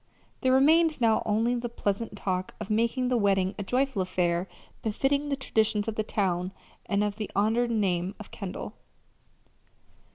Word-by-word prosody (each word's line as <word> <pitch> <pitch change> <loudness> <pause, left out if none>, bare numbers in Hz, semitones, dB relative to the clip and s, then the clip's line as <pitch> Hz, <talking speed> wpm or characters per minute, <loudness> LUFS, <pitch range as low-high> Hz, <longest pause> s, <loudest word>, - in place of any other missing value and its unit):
There 260 - +2
remained 310 +4 +4
now 225 -2 +3
only 225 +3 +2
the 240 0 -2
pleasant 205 -1 -2
task 185 -2 -2
of 200 - -5
making 235 +3 +1
the 250 - +2
wedding 195 -3 +2
a - - -2
joyful 255 0 0
affair 180 -1 0 0.3
befitting 275 +6 0
the 280 - +1
traditions 220 -5 0
of 225 - -1
the 215 - -1
town 185 -3 -1 0.3
and 200 0 +1
of 205 0 -2
the 215 -2 -4
honored 225 +4 +2
name 190 -4 0
of 215 - -10
Kendall. 195 +1 -6
215 Hz, 160 wpm, -28 LUFS, 195-245 Hz, 0.3 s, remained